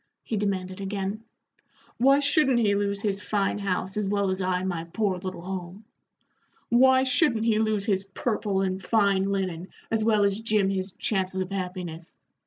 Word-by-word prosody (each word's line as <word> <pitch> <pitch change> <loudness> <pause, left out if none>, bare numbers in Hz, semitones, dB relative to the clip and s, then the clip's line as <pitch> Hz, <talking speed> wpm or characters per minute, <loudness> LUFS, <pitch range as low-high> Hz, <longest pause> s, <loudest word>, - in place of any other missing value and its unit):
he 225 - -3
demanded 195 -2 -2
again. 200 +2 -3 0.7
"Why 275 +3 +5
shouldn't 285 -3 +3
he 215 -4 +3
lose 200 0 -1
his 205 -1 -1
fine 205 0 -1
house 190 0 -2
as 210 -2 0
well 200 -1 +1
as 185 +1 -2
I 185 0 0
my 175 -3 -3
poor 190 +1 -1
little 185 -2 -6
home? 190 +2 -6 0.8
Why 260 +2 +5
shouldn't 255 -4 +2
he 220 -2 +3
lose 215 -2 +1
his 195 -3 +1
purple 200 0 -1
and 190 0 -2
fine 200 -1 +2
linen 185 -3 -2 0.2
as 220 -1 +1
well 215 -2 +3
as 200 +1 +1
Jim 215 -3 +1
his 190 -1 -3
chances 190 -2 0
of 185 +1 -4
happiness? 180 -3 -5
200 Hz, 170 wpm, -26 LUFS, 185-215 Hz, 0.8 s, Why